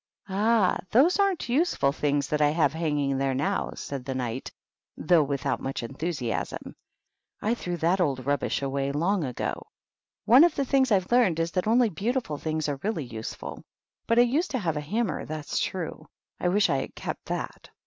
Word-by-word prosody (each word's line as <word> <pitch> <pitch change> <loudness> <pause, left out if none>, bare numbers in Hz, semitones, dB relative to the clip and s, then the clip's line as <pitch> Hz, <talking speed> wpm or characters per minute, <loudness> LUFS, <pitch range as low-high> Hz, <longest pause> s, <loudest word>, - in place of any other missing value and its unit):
"Ah! 210 0 +2
those 290 - +4
aren't 395 -8 +1
useful 250 - +2
things 145 -1 0
that 150 0 0
I 145 - +5
have 150 -2 +2
hanging 145 -4 0
there 135 -1 0
now," 140 +3 0
said 140 -3 -5
the 135 0 -4
Knight, 125 0 -3 0.5
though 170 0 +4
without 140 -2 -1
much 135 -2 -4
enthusiasm. 135 -1 -4 0.6
"I 220 - 0
threw 175 -7 -4
that 175 +4 +2
old 135 -6 0
rubbish 140 0 0
away 135 0 -1
long 170 +6 +1
ago. 125 -4 -4 0.6
One 250 +7 +8
of 345 -2 +4
the 275 - 0
things 265 -1 +2
I've 190 -1 +2
learned 230 -10 +4
is 165 0 0
that 185 +3 -1
only 235 +1 +4
beautiful 210 - -2
things 155 -1 -2
are 140 -2 -2
really 195 -7 -2
useful. 115 -2 -7 0.4
But 230 - +2
I 240 - +8
used 290 +9 +1
to 265 - -1
have 170 -9 -1
a 150 - -2
hammer, 215 +10 -1
that's 155 -1 -3
true. 180 -4 -4 0.3
I - - 0
wish 200 +3 +3
I 135 - +1
had 135 - -5
kept - - -5
that." - - -5
165 Hz, 185 wpm, -27 LUFS, 140-225 Hz, 0.6 s, One